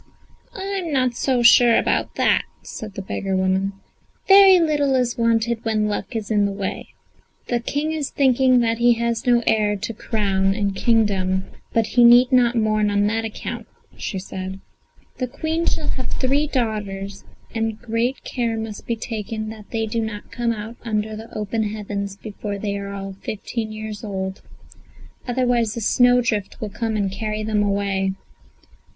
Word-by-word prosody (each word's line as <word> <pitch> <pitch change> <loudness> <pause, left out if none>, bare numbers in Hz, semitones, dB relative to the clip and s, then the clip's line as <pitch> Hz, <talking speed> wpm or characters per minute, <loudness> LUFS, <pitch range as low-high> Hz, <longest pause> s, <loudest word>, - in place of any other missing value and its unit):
"I 385 - -5
am 390 -4 -3
not 255 -3 +2
so 245 0 +1
sure 235 0 +7
about - - 0
that," - - +3 0.2
said 210 -3 -8
the 195 - -5
beggar 195 0 -2
woman. 190 +1 +1 0.5
"Very 390 -1 +8
little 295 -4 +2
is 250 -2 +1
wanted 230 0 +1
when 215 -2 +1
luck 210 +3 -4
is 220 -1 -3
in 205 -1 +3
the - - -3
way. 195 -1 -5 0.5
The 240 - +1
King 290 +6 -2
is 305 -3 -2
thinking 260 -2 +4
that 230 0 0
he 240 0 +5
has 235 0 -2
no 240 -1 +4
heir 210 -2 +2
to 225 +4 -4
his 215 - -19
crown 195 -3 +1
and 200 -2 -1
kingdom, 190 -4 +1 0.3
but 225 -1 +2
he 245 - +6
need 240 +1 +7
not 245 -2 +4
mourn 215 -2 +2
on 205 0 +2
that 225 +2 0
account," 220 - -6 0.3
she 195 - -4
said. 190 0 -6 0.6
"The 255 - -1
Queen 320 +6 -2
shall - - 0
have 260 - -3
three 280 +3 +1
daughters, 205 -7 -3 0.3
but 225 -1 -2
great 235 +3 -1
care 235 -3 -2
must 220 -2 -6
be 235 - 0
taken 220 -1 -5
that 215 -2 -10
they 225 -1 -1
do 225 +1 -2
not 215 -2 -6
come 240 -1 -1
out 220 +1 -6
under 215 -1 -2
the 220 +1 -9
open 215 +1 -2
heavens 205 -2 -4
before 205 -1 -6
they 200 0 -3
are 200 0 -5
all 195 -1 -6
fifteen 220 +1 -4
years 215 0 -6
old; 190 -2 -4 0.9
otherwise 245 -3 +1
a - - -3
snowdrift 245 -3 +2
will 215 - -4
come 225 +1 -2
and 200 -2 0
carry 215 +1 -3
them 215 -1 +1
away." 200 -1 0
220 Hz, 170 wpm, -22 LUFS, 205-240 Hz, 0.9 s, Very